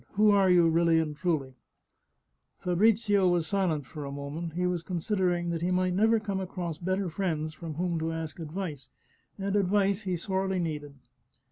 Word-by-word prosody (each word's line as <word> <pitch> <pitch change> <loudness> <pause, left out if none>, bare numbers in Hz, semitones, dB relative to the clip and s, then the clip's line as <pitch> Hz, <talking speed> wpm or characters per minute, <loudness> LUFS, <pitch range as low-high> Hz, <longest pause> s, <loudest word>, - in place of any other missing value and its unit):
Who 210 +1 +5
are 195 -2 +4
you, 175 -2 +6
really 165 0 +3
and 155 -2 0
truly? 150 -6 -1 0.5
" - - -48
Fabrizio 200 +1 +3
was 175 -2 +1
silent 165 -5 0
for 150 +3 -8
a 140 - -5
moment; 145 +4 -5
he 180 +2 -1
was 180 -2 0
considering 175 -1 -1
that 165 -1 -3
he 175 - 0
might 185 0 +1
never 220 +4 +3
come 200 -2 -3
across 175 -4 -4
better 185 +2 -1
friends 160 -3 -2
from 160 -1 -7
whom 170 0 -1
to 160 +1 -1
ask 160 0 -5
advice, 160 -3 -5 0.5
and 195 0 -2
advice 200 0 +2
he 185 -3 -2
sorely 190 +2 -1
needed. 150 -4 -3
175 Hz, 175 wpm, -29 LUFS, 160-195 Hz, 0.5 s, you